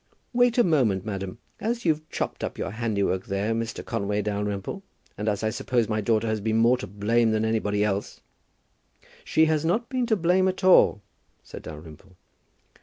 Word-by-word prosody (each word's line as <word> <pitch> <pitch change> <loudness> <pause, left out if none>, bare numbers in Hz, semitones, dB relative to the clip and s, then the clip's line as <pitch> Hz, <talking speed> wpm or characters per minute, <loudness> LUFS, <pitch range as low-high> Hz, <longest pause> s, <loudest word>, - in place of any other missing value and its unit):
"Wait 245 0 +3
a 240 - +6
moment, 120 - +2
madam. 95 0 -4 0.2
As 235 +1 -2
you've 155 -1 0
chopped - - -4
up - - -4
your 95 - -3
handiwork 100 -4 -1
there, 100 +3 -1
Mr. 115 0 -4
Conway 105 +1 -1
Dalrymple, 105 - -3 0.3
and 105 +1 -2
as 105 0 -2
I 110 - +1
suppose 120 -1 0
my 110 -1 -1
daughter 110 +1 +1
has 110 -1 -1
been 110 +1 0
more 115 +2 +5
to - - -6
blame 110 +4 +1
than 110 0 +1
anybody 105 -2 0
else 100 -1 -2 0.5
" - - -44 0.3
"She 160 - +3
has 155 -1 +1
not 215 +9 0
been 255 -2 -1
to 225 - +3
blame 185 +1 +2
at 185 +1 -2
all," 180 - +5 0.4
said - - -10
Dalrymple. 80 +4 -11
110 Hz, 180 wpm, -25 LUFS, 100-160 Hz, 0.5 s, a